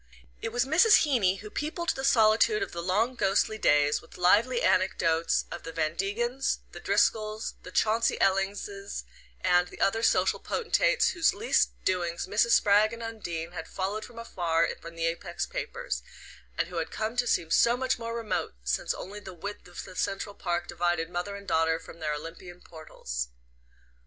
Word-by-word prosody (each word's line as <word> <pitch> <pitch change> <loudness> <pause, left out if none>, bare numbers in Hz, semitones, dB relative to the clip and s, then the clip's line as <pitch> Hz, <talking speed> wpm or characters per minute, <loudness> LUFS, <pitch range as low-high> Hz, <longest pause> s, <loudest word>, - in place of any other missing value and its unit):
It 225 - -3
was 245 +2 +1
Mrs. 355 +10 +6
Heeny 235 -11 +2
who 210 -1 -9
peopled 330 +3 -3
the 265 - -1
solitude 255 - +4
of - - -6
the 170 - -5
long 205 +8 +1
ghostly 215 0 +1
days 145 -3 +3
with - - -15
lively 220 +8 +3
anecdotes 170 -3 +2
of 175 - -6
the 165 - -7
Van 160 0 -1
Degens, 240 +8 -1
the - - -9
Driscolls, 215 0 +1
the - - -10
Chauncey 225 +4 +1
Ellings 195 +1 +1 0.7
and 180 -1 +3
the - - -13
other 225 +3 +2
social - - +2
potentates - - +2
whose 340 0 +2
least 440 +4 +2 0.2
doings 175 -2 0
Mrs. 210 +4 +2
Spragg 210 +2 +4
and 230 0 -7
Undine 175 -8 -5
had 170 -2 -7
followed 200 +3 -3
from 240 - -12
afar 170 -8 0
in 165 0 -7
the 165 0 -1
Apex 170 +1 -2
papers, - - -4 0.6
and - - 0
who 180 - -6
had 165 - -2
come 220 +2 -3
to 245 0 +1
seem 165 -7 0
so 235 +1 +4
much 260 -1 0
more 230 0 -4
remote 220 - -2
since - - -1
only 205 +3 -7
the 190 -3 -10
width 200 +4 -7
of 175 - -8
the - - -12
Central 200 +1 -2
Park 175 -3 -2
divided 175 -1 -1
mother 180 +3 -3
and 200 0 -10
daughter 160 0 +2
from 165 0 -13
their 150 -2 -1
Olympian 170 +3 -9
portals. 60 - -6
195 Hz, 175 wpm, -28 LUFS, 170-230 Hz, 0.7 s, Mrs